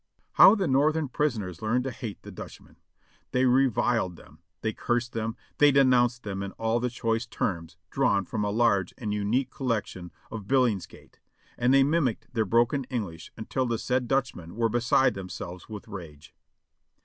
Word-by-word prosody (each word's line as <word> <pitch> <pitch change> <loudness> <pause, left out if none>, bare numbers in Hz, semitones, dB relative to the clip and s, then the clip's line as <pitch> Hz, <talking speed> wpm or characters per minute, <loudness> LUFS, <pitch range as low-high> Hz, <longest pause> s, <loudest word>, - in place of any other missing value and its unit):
How - - +8
the 195 -5 -1
Northern 150 +2 +2
prisoners 110 - -2
learned 120 +3 +1
to 130 - -3
hate 115 -5 -7
the - - -9
Dutchmen; - - -11 0.6
they 125 +1 +3
reviled 120 -6 +2
them, - - -17 0.2
they 110 - -1
cursed 120 +2 -1
them, 115 0 -3 0.2
they 145 0 +7
denounced 125 -3 +3
them 100 -2 -4
in 100 0 -5
all 115 +1 0
the 125 +1 -1
choice 115 -1 -2
terms 85 -6 -3
drawn 100 -8 +2
from 105 - -3
a 105 - 0
large 100 -4 +1
and 105 -3 -3
unique 105 +6 0
collection 110 - -3 0.2
of 105 -3 -7
Billingsgate, 125 -8 -1 0.4
and 125 +1 +2
they 135 0 +6
mimicked 140 -6 0
their 110 -2 +1
broken 120 +6 +2
English 105 -11 -5
until 125 +3 -2
the 115 -1 0
said 125 +2 -1
Dutchmen 115 -10 -2
were 115 0 +1
beside 120 +3 +3
themselves 90 -1 -8
with 110 +2 -8
rage. 80 -8 -10
115 Hz, 165 wpm, -27 LUFS, 100-130 Hz, 0.6 s, How